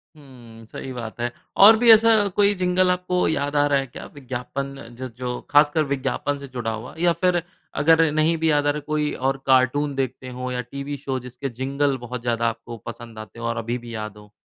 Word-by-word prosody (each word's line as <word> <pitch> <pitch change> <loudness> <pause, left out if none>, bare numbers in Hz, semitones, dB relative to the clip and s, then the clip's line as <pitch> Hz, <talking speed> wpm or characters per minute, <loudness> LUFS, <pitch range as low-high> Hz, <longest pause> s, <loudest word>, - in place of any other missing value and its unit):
हुँ, 120 -6 -15
सही 135 - -7
बात 115 -2 -7
है। 120 0 -1 0.3
और 220 +1 +9
भी 235 0 +6
ऐसा 225 +1 +7 0.2
कोई 205 0 +4
जिंगल 180 0 +2
आपको 180 0 0
याद 145 -1 -1
आ 145 0 +4
रहा 140 -1 +3
है 135 - -4
क्या 120 - -10
विज्ञापन 135 +1 -5 0.3
ज 130 - -4
जो 125 -1 -3
खासकर 145 +2 +4
विज्ञापन 140 +1 -2
से 140 - -8
जुड़ा 120 -3 -4
हुआ। 110 +3 -7
या 175 0 +3
फिर 180 -1 +3 0.4
अगर 165 +1 +6
नहीं 155 +2 +2
भी 160 0 +2
याद 145 -1 +2
आ - - +4
रहा 145 - 0
है 150 - -5
कोई 150 -1 0
और 135 +1 -1
कार्टून 135 +2 +3
देखते 130 -1 -3
हो 125 0 -3
या 125 0 -2
टीवी 140 +3 -6
शो 135 -1 -3
जिसके 125 +2 -6
जिंगल 140 +1 0
बहुत 125 0 -5
ज़्यादा 115 -1 0
आपको 115 +1 -8
पसंद 115 -2 -9
आते 110 +2 -10
हो 115 - -5
और 115 0 -2
अभी 115 +2 -2
भी 120 -1 -10
याद 110 -1 -6
हो। 105 0 -16
135 Hz, 220 wpm, -23 LUFS, 120-150 Hz, 0.4 s, और